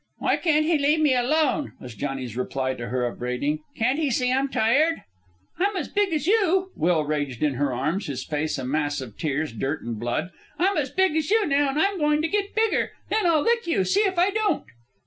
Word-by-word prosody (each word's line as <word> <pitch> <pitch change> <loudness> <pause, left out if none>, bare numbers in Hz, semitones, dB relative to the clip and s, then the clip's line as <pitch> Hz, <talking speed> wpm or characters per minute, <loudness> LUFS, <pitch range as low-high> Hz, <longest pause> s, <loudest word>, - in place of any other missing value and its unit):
"Why - - +1
can't 310 -2 +2
he 320 -1 +2
leave 295 +3 +3
me 300 -4 +4
alone?" 295 +3 +1
was 125 -2 -9
Johnny's 130 0 -4
reply 130 +1 -2
to 120 -2 -6
her 125 +1 -1
upbraiding. 125 +5 -2 0.2
"Can't 255 +6 +1
he 305 -3 +1
see 250 0 +1
I'm 270 +1 +1
tired?" 290 +9 +2 0.6
"I'm 400 +2 +1
as - - -3
big 410 -2 +1
as 305 -3 -1
you," 380 -2 +2
Will 165 -2 +1
raged 145 -4 -2
in 150 -2 +2
her 140 +2 0
arms, 160 - -2
his 130 -3 -4
face 155 0 -2
a 130 - -4
mass 145 +1 -1
of 125 -6 -8
tears, 150 -3 -2
dirt, 135 +7 -3
and 115 -2 -5
blood. 120 - -2 0.3
"I'm 385 +3 +2
as 285 -5 0
big 375 +1 +1
as 315 0 0
you 435 0 +3
now, 285 0 +2
an' 270 - -3
I'm 395 +4 +1
goin' 300 0 +2
to - - +2
git 405 +3 -2
bigger. 445 0 +1 0.2
Then 430 -4 +2
I'll 320 -3 +3
lick 470 -4 +1
you 330 - +2
see 390 - +2
if 385 -4 0
I 360 +3 +3
don't." 430 0 0
270 Hz, 225 wpm, -24 LUFS, -, 0.6 s, me